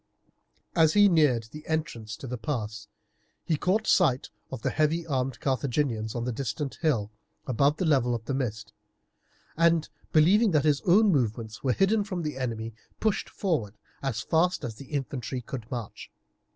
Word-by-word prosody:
As 160 -2 +5
he 205 0 +7
neared 150 - +3
the 150 0 -9
entrance 120 -9 -3
to - - -9
the 125 -1 -4
pass 110 -4 -4 0.6
he 160 - +1
caught 195 +8 +1
sight 135 -9 +3 0.2
of 130 -4 -7
the - - +1
heavy 160 +2 +1
armed 130 -5 -2
Carthaginians 125 -4 -1
on 120 - -2
the 125 - -1
distant 130 +3 -4
hill 120 -11 +1 0.3
above 140 +4 +2
the 185 - -1
level 130 -6 +3
of 115 -1 -6
the 135 - -2
mist, 110 -6 -3 0.8
and 165 -1 +3 0.2
believing 195 +9 +5
that 150 -2 +3
his 145 -2 +3
own 205 +4 +6
movements 115 - -1
were 130 -2 +2
hidden 205 - +2
from 185 -4 -4
the 150 -3 -3
enemy, 115 -3 -3 0.3
pushed 215 -2 0
forward 130 - -2 0.2
as 125 -5 -2
fast 175 +7 +1
as 120 - -3
the 125 +6 -11
infantry 135 -3 -3
could 120 -1 -7
march. 120 -5 -6
135 Hz, 165 wpm, -27 LUFS, 115-160 Hz, 0.8 s, he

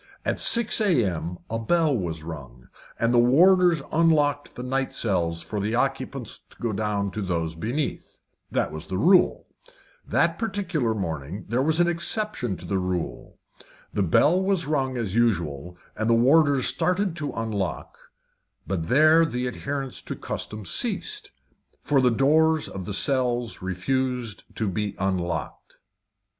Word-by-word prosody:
At - - -1
six 235 -1 +1
a.m. 95 - +1
a 115 - -3
bell 155 +5 +2
was 85 -7 -3
rung, 70 -6 -9 0.3
and 115 +1 +1
the 120 - +5
warders 170 +5 +5
unlocked 150 -3 +2
the 125 - -6
night 135 +1 -1
cells 85 -6 -1
for 105 - -4
the 105 +3 -1
occupants 135 -2 -2
to - - -19
go 115 -2 -2
down 100 -1 -1
to 105 - -4
those 85 -4 -2
beneath. 120 - -4 0.3
That - - 0
was 80 +1 -8
the 95 - -3
rule. 180 - +4 0.6
That - - +1
particular 185 - -1
morning 85 -2 -4
was 140 +7 +1
an 175 - +4
exception 170 - -1
to 90 - -11
the 95 +2 -1
rule. 90 -2 -4 0.6
The - - 0
bell 150 - +4
was 190 -3 +1
rung 135 -4 -1
as 110 -6 -2
usual, 90 -8 0 0.2
and 110 +1 -1
the 115 - +5
warders 140 +2 +4
started 180 +7 0
to 145 -3 -3
unlock, 105 -4 -3 0.7
but 85 -4 -2
there 155 - +6
the 125 -6 -1
adherence 135 +1 -4
to - - -6
custom 105 -1 -6
ceased, 405 - -3 0.5
for 140 -2 +2
the 125 - +4
doors 155 +5 +3
of 95 -2 -7
the 105 - -4
cells 125 -3 0
refused 120 +5 -2
to 110 - -1
be 100 +1 -2
unlocked. 85 -6 -3
120 Hz, 150 wpm, -25 LUFS, 95-155 Hz, 0.7 s, there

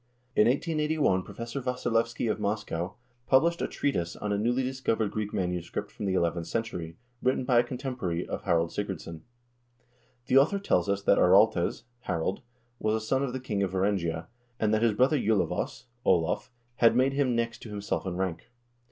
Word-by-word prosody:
In 105 - +5
1881 150 - +1
Professor 115 +7 -6
Wassilievsky 120 -2 0
of 110 - 0
Moscow 100 -4 -2 0.3
published 170 +6 +4
a - - 0
treatise 85 -12 -1
on 105 - -4
a - - +1
newly 120 +4 +1
discovered 125 -5 -1
Greek 105 -1 -3
manuscript 90 -2 -3
from - - -6
the 95 - +1
eleventh 85 -1 0
century, 90 -8 -4 0.2
written 130 0 +1
by 125 -2 +4
a - - +4
contemporary 125 -9 -3
of - - -4
Harald 85 -3 +1
Sigurdsson.1 90 -5 -5 1.0
The 130 +2 +6
author 160 +9 +3
tells 100 - +1
us 100 0 0
that - - +4
Araltes - - +4 0.2
(Harald) 85 +2 -1 0.4
was 110 0 +1
a - - 0
son 135 +3 +1
of 140 -2 -1
the 130 - -4
king 110 -6 -2
of 95 -2 -1
Varangia, 90 -4 0 0.3
and 110 -1 +2
that 110 - +2
his 115 -2 +3
brother 135 +5 +3
Julavos 100 -5 0 0.2
(Olav) 85 +7 +2 0.3
had 115 -1 +5
made 130 +2 +3
him 135 -3 +1
next 115 0 -1
to 115 - -9
himself 105 -1 -3
in 90 - -3
rank. 95 +2 -3
110 Hz, 175 wpm, -28 LUFS, 95-125 Hz, 1.0 s, The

